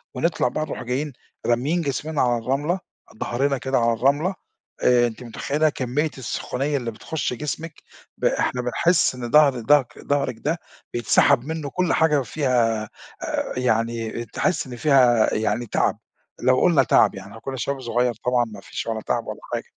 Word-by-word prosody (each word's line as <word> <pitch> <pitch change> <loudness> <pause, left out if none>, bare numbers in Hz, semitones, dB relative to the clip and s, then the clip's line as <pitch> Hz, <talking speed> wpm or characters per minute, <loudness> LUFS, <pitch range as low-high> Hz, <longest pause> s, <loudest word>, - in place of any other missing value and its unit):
ونطلَع 145 +2 +1
بقى 155 +5 -2
نروح 125 - -6
جايين 135 +4 -2 0.3
راميين 135 +9 +1
جسمنا 150 +1 -2
على 120 -1 +2
الرملة، 145 +9 0 0.4
ضَهرنا 135 +5 0
كده 130 +2 -1
على 115 0 +3
الرملة 145 - +1 0.5
آآ، 120 -1 +5
أنتِ 120 +2 -8
متخيّلة 145 +6 0
كمية 145 +3 -1
السخونية 135 +3 -2
اللي 120 -3 -3
بتخُش 135 +6 -3
جسمِك 150 +5 -4 0.4
ب - - -3
إحنا 125 - +1
بنحس 160 +5 +2
إن 120 -1 -5
ضهر 145 -4 +5
ضهك 130 +2 +2
ضهرك 140 -3 -1
ده 160 +4 -1 0.4
بيتسحَب 120 0 +4
مِنُّه 155 -2 -4
كلّ 180 +2 0
حاجة 150 -3 +3
فيها 120 -6 +1
آآ، 110 - -10 0.7
يعني 115 -1 -1
تحس 135 - -1
إن 125 - -7
فيها 120 -3 +4
يعني 110 +2 0
تعَب، - - 0 0.5
لو 130 0 +4
قلُنا 165 -7 +5
تعَب 115 - +4
يعني 95 +1 -9
إحنا 110 +2 -11
كنا 135 -1 -5
شباب 135 +3 -2
صغيّر 120 0 +1
طبعًا 125 -1 +3
ما 105 -3 -10
فيش - - -6
ولا 110 -1 -2
تعَب - - -1
ولا - - -6
حاجة. - - -1
130 Hz, 165 wpm, -23 LUFS, 120-150 Hz, 0.7 s, آآ